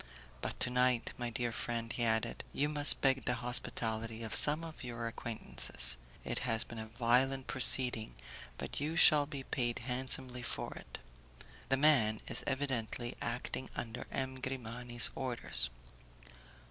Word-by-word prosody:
But - - -4
to 125 - +8
night, 125 -1 +1
my 120 -1 -4
dear 120 0 -2
friend," 115 0 -4
he 120 - -2
added, 110 -1 0
"you 145 - 0
must 145 -1 +6
beg 135 -1 +2
the 125 - +1
hospitality 115 -2 -1
of 110 - -5
some 150 +2 +6
one 165 - -6
of 155 - -12
your 120 -1 -5
acquaintances. 110 - 0 0.3
It - - -2
has 115 -3 +2
been 115 - -9
a 110 - -7
violent 125 +4 +1
proceeding, 125 -3 +1 0.4
but - - -5
you 150 +3 -3
shall 150 -3 +5
be 140 -3 -7
paid 120 -3 -2
handsomely 125 0 +1
for 120 - -5
it; - - -10 0.7
the 135 - +2
man 130 -7 +3
is - - 0
evidently 125 -4 -3
acting 125 +2 -4
under 115 -2 -6
M. 130 -1 -4
Grimani's 120 -2 +1
orders." 125 - 0
125 Hz, 150 wpm, -33 LUFS, 115-135 Hz, 0.7 s, to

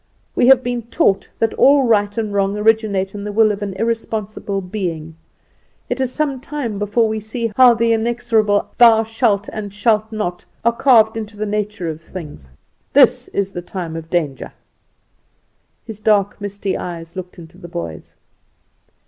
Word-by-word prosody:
We 245 - +2
have 260 -1 +6
been 245 -1 -2
taught 230 - 0
that 225 -1 0
all 280 0 +5
right 205 -3 +1
and 215 -2 -2
wrong 200 0 0
originate 210 -3 +1
in 205 -1 -6
the 210 - -4
will 215 +1 +4
of 205 0 -5
an 200 -2 -4
irresponsible 215 -2 -3
being. 175 -5 -5 0.8
It 250 +2 -1
is 260 -1 0
some 285 -2 -1
time 255 -7 -5
before 210 +2 +1
we 220 0 -2
see 225 +2 -3
how 250 -2 +7
the 230 0 +2
inexorable 225 -2 +1
'Thou 225 -2 +7
shalt 220 -2 0
and 210 -2 -5
shalt 215 +1 +1
not,' 180 -5 -3 0.2
are 235 - +5
carved 225 -4 +4
into 215 -1 -7
the 215 - -2
nature 210 -3 -3
of 160 0 -5
things. 150 - -10 0.4
This - - +5
is 195 -1 -2
the 175 - -5
time 175 -2 -6
of 165 0 -7
danger." 155 -6 -2 1.3
His 220 -3 -8
dark, 210 -1 +1
misty 200 -1 -3
eyes 170 -1 -7
looked 185 0 -8
into 170 +1 -13
the 175 - -10
boy's. 85 - -7
210 Hz, 165 wpm, -19 LUFS, 190-225 Hz, 1.3 s, how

